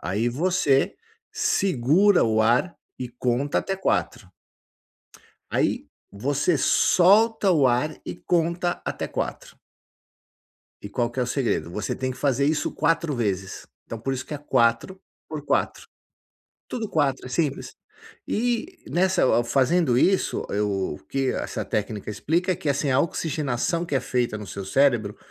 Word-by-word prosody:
Aí, 100 +8 -1
você 155 +3 +1 0.4
segura 180 +4 +3
o 110 -1 +2
ar 120 +10 +2 0.2
e 125 -1 -4
conta 125 +3 -1
até 195 - -2
4. 190 - -1 1.2
Aí, - - 0 0.2
você 145 - 0
solta 205 +3 +4
o 150 -7 +4
ar 130 +5 +1
e - - -5
conta 175 0 0
até - - -3
4. - - -5 1.2
E 100 - -8
qual 120 +3 -1
que 125 +2 -4
é - - +3
o - - -1
segredo? 120 - -1
Você 105 +2 -3
tem 130 0 -3
que 130 - -7
fazer 140 -1 +1
isso 155 0 0
4 165 0 0
vezes. 100 -5 -3 0.2
Então, 115 - -6
por 135 +4 -2
isso 130 - -5
que 150 - -7
é - - -5
4 130 +6 +1 0.3
por 150 -2 -6
4. - - -1 0.8
Tudo 230 -4 -4
4, 140 -7 0
é - - -6
simples. 140 +1 -2 0.5
E 245 - -1
nessa, 185 +1 +1
eu - - +4
ao 120 - +3
fazendo 135 +1 +2
isso, 190 +7 +2
eu 100 -4 -1
o - - -10
que 135 -1 0
essa - - -4
técnica 105 0 -3
explica 170 - 0
é 180 - 0
que 150 - -3
assim, 140 0 0
a 130 - +3
oxigenação 155 0 -1
que 145 - -3
é - - +3
feita 120 -3 -1
no 105 - -8
seu 100 +2 -6
cérebro, 115 -2 +2
135 Hz, 155 wpm, -24 LUFS, 120-170 Hz, 1.2 s, solta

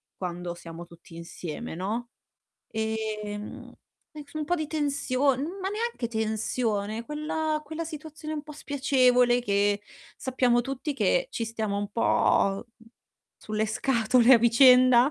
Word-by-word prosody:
quando 175 -1 -5
siamo 170 0 -9
tutti 170 0 -16
insieme, 170 +4 -7
no, 220 +7 -3 0.6
ehm, 215 -1 -4 0.4
e 300 - -8
so 310 - -7
un 305 - -2
po' 350 +4 0
di 310 -2 -3
tension 280 -3 0 0.2
ma 380 - -2
neanche 425 - -3
tensione, 220 -1 -2
quella 305 +2 -2
quella 315 +2 -5
situazione 310 -1 -7
un 300 - -4
po' 305 - -12
spiacevole 255 -4 +3
che 205 -1 +1 0.3
sappiamo 250 -2 +1
tutti 275 +3 -4
che - - +1
ci 230 - -3
stiamo 220 -2 -3
un 205 0 -3
po' 195 -3 +2
mhmm, 225 0 -19 0.5
sulle 215 0 -2
scatole 235 +2 +3
a - - +6
vicenda, 250 +2 +6
240 Hz, 135 wpm, -27 LUFS, 215-285 Hz, 0.6 s, a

